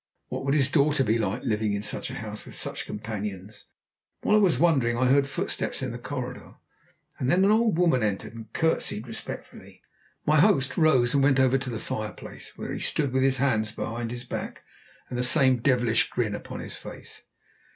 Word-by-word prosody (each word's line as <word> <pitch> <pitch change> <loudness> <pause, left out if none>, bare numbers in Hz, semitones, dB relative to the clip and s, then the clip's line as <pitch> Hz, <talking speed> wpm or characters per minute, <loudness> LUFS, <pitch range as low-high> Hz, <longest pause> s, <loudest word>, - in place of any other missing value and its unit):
What - - -4
would 140 +1 +2
his 135 -2 +3
daughter 140 0 +3
be 115 -1 +1
like, 105 +3 -2
living 105 -1 0
in 100 0 -2
such - - -3
a - - -6
house, - - -6
with - - -8
such - - -1
companions? 105 -2 -6 0.6
While 210 - +3
I - - +6
was 190 -5 +3
wondering, 135 -9 +3
I 130 - +2
heard 140 +2 +4
footsteps 140 - -2
in 130 - -2
the 120 - -6
corridor, 125 -1 -6 0.6
and 130 - 0
then 185 +5 +4
an 205 - +4
old 220 -4 +3
woman 165 -8 +3
entered 105 0 -2
and 110 -1 -10
curtsied 145 -8 0
respectfully. 115 -3 -8 0.4
My 155 0 +4
host 150 -7 +3
rose 135 -7 +4
and 140 - +3
went 135 -1 +4
over 130 0 +4
to 135 -1 -5
the 115 - -3
fireplace, 110 0 -6
where - - -5
he - - -4
stood 140 -4 0
with 130 - +2
his 135 0 +3
hands 110 -5 +1
behind 115 +1 -4
his 120 +1 -6
back - - -6 0.4
and 125 - -4
the - - +1
same 130 -1 +5
devilish 120 -2 +2
grin 115 -4 -1
upon - - -6
his - - -7
face. - - -10
125 Hz, 200 wpm, -26 LUFS, 115-140 Hz, 0.6 s, I